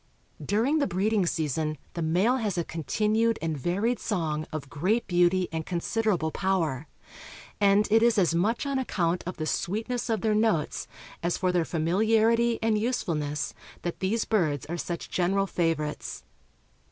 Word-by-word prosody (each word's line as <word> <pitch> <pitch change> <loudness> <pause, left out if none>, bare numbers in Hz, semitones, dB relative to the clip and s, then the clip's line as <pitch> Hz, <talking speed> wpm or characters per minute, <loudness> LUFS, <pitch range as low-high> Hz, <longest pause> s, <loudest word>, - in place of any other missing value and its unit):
During 245 +10 +2
the 285 - +1
breeding 195 +1 +1
season 155 -1 -1 0.2
the 170 - -4
male 185 +11 +2
has 210 -7 -2
a 170 - +1
continued 215 +8 0
and 160 -1 -2
varied 195 - 0
song 155 -7 -2
of 155 -3 -5
great 185 - 0
beauty 180 +1 +3
and 160 -1 -2
considerable 180 -1 0
power; 165 -8 -1 0.7
and 200 +1 +4
it 225 +1 +6
is 235 -1 +4
as 180 -4 +3
much 210 +10 +1
on 275 -1 0
account 180 -8 0
of 180 - -5
the 155 - -2
sweetness 225 +10 -2
of 220 -4 0
their 220 -1 +2
notes 210 -8 +1 0.3
as 175 0 0
for 185 -1 +1
their 175 -2 +1
familiarity 220 +8 +2
and 220 -1 +2
usefulness 160 - -1 0.3
that 175 - -3
these 215 +4 0
birds 155 - 0
are 170 - -4
such 170 0 -5
general 195 +2 +1
favorites. 165 -5 -2
185 Hz, 155 wpm, -27 LUFS, 165-220 Hz, 0.7 s, it